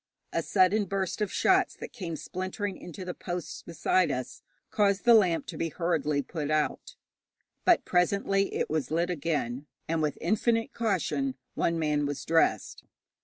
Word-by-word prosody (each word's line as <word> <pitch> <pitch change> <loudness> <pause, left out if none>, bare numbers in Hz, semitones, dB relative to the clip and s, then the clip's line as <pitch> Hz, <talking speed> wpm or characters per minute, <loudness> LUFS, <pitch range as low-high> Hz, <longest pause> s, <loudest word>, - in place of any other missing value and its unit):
A - - +1
sudden 200 +2 +3
burst 195 +1 -2
of 210 - 0
shots 380 -1 +3
that - - -9
came 180 -8 -5
splintering 185 +5 -4
into 180 +2 -9
the 180 - -4
posts 175 -4 -5
beside 170 +2 +1
us 125 0 -4 0.3
caused 200 0 +2
the 240 - +8
lamp 185 -7 +4
to - - -7
be 165 - 0
hurriedly 155 -4 0
put 150 -2 -4
out; 155 0 -1 0.7
but 355 - +4
presently 195 +2 +2
it - - 0
was 155 -2 -1
lit 170 +3 0
again, 145 -5 -2 0.2
and 165 0 0
with 150 -2 -1
infinite 225 +5 +1
caution 150 - 0 0.2
one 170 - 0
man 150 -2 +1
was 145 -1 -4
dressed. 165 0 +1
175 Hz, 160 wpm, -28 LUFS, 155-195 Hz, 0.7 s, the